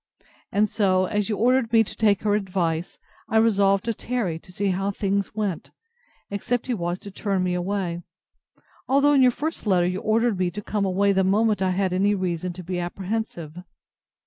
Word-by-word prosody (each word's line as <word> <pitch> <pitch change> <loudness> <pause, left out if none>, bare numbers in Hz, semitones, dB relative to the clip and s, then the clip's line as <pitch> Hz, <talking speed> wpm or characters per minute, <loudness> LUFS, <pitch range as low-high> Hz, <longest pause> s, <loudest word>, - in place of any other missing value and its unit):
And 210 +1 +3
so, 190 -4 +2
as 210 +1 -1
you 210 - -1
ordered 250 0 +2
me 225 -1 +5
to 200 - -8
take 205 -3 +2
her 210 -1 +2
advice, 180 -5 -1 0.3
I 220 - +2
resolved 200 -3 +3
to 230 - 0
tarry 215 -8 -3
to 180 - -16
see 200 +2 -1
how 195 +2 -1
things 200 0 -1
went, 205 -5 -3 0.6
except 230 +4 -2
he 255 - -1
was 175 -4 -2
to 200 - -10
turn 195 -1 -1
me 180 -1 0
away; 180 -1 -2 0.9
although, 280 +2 +4
in 275 - +5
your 255 - +7
first 300 0 -4
letter, 180 -3 +3
you 185 +1 -1
ordered 220 -1 +1
me 180 -1 +1
to 205 +4 -6
come 205 0 -1
away 195 +2 +2
the 190 -1 +2
moment 210 +2 +2
I 190 - +2
had 185 0 0
any 200 +3 +2
reason 180 -2 -2
to 180 +1 -9
be 180 +1 -3
apprehensive. 175 -3 -4
200 Hz, 195 wpm, -24 LUFS, 185-220 Hz, 0.9 s, your